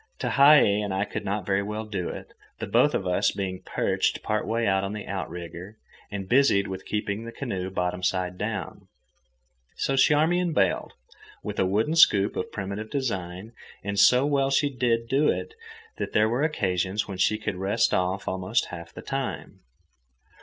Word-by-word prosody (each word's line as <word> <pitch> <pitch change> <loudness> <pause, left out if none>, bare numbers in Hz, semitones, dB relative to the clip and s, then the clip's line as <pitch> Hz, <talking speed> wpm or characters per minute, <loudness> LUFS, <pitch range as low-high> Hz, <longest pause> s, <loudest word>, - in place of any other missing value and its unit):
Tehei 140 -8 +5
and 100 - -3
I 100 +2 0
could - - -5
not 100 0 -2
very 95 0 +1
well 105 +2 -4
do 100 -4 -3
it, - - -9 0.2
the - - -4
both - - +3
of 95 - -2
us 90 0 +2
being 95 -2 -4
perched - - -1
part 110 0 -1
way 115 +1 0
out 95 -1 +2
on 100 +1 -3
the 105 -1 -6
outrigger 90 +1 -6 0.3
and 100 -2 -5
busied 120 -5 +3
with 95 0 -7
keeping 105 0 -2
the 115 - -7
canoe 95 -9 -4
bottom 90 -1 -2
side 90 0 -1
down. - - -5 0.9
So 135 - -1
Charmian 160 +5 +3
bailed, 95 -8 +1 0.5
with - - -5
a 95 - +3
wooden 110 - +1
scoop 100 -10 +5
of - - -4
primitive 100 +2 -5
design, 100 -6 -4 0.3
and 100 0 -2
so 125 +6 +6
well 140 -2 +1
did 135 - +3
she 145 - +2
do 125 +3 +1
it - - -2 0.5
that - - -4
there 105 +1 +4
were 120 +4 0
occasions 100 - 0
when 95 -3 -7
she 110 +3 +2
could 110 -3 -4
rest 100 +5 +1
off 90 +2 0
almost 95 +5 0
half 85 -1 -8
the - - -10
time. 135 -1 -4
100 Hz, 175 wpm, -26 LUFS, 95-120 Hz, 0.9 s, so